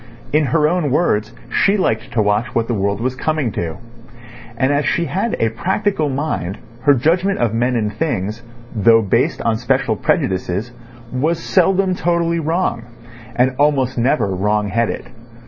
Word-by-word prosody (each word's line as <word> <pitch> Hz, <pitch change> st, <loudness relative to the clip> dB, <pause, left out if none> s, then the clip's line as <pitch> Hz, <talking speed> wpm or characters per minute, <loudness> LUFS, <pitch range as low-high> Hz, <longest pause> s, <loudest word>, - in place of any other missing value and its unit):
In 155 Hz, 0 st, +3 dB
her 150 Hz, +2 st, +2 dB
own 170 Hz, -2 st, 0 dB
words, 110 Hz, -7 st, +1 dB, 0.2 s
she 200 Hz, +1 st, +3 dB
liked 110 Hz, -, -1 dB
to 110 Hz, -, +2 dB
watch 105 Hz, +3 st, 0 dB
what 115 Hz, -1 st, +1 dB
the 120 Hz, -, -1 dB
world 100 Hz, -1 st, -1 dB
was 130 Hz, +1 st, -1 dB
coming 155 Hz, -3 st, -1 dB
to. 80 Hz, -4 st, -4 dB, 0.8 s
And 130 Hz, +3 st, +2 dB
as 145 Hz, +1 st, +1 dB
she 170 Hz, -, 0 dB
had 195 Hz, +7 st, -1 dB
a 115 Hz, -, +2 dB
practical 185 Hz, -, -1 dB
mind 130 Hz, -, -3 dB, 0.2 s
her 145 Hz, +2 st, +5 dB
judgment 175 Hz, +9 st, +1 dB
of 115 Hz, -2 st, 0 dB
men 125 Hz, +2 st, +1 dB
and 105 Hz, -2 st, -1 dB
things, 110 Hz, -, -2 dB, 0.3 s
though 115 Hz, +1 st, +5 dB
based 100 Hz, -, 0 dB
on 115 Hz, -1 st, +1 dB
special 125 Hz, -1 st, 0 dB
prejudices, 95 Hz, +3 st, -1 dB, 0.4 s
was 155 Hz, +7 st, 0 dB
seldom 190 Hz, +2 st, +2 dB
totally 170 Hz, -1 st, 0 dB
wrong, 165 Hz, -4 st, -1 dB, 0.5 s
and 130 Hz, +1 st, +2 dB
almost 140 Hz, -3 st, +2 dB
never 120 Hz, -4 st, +1 dB
wrong 105 Hz, +2 st, 0 dB
headed. 115 Hz, +4 st, -1 dB
130 Hz, 160 wpm, -18 LUFS, 110-160 Hz, 0.8 s, her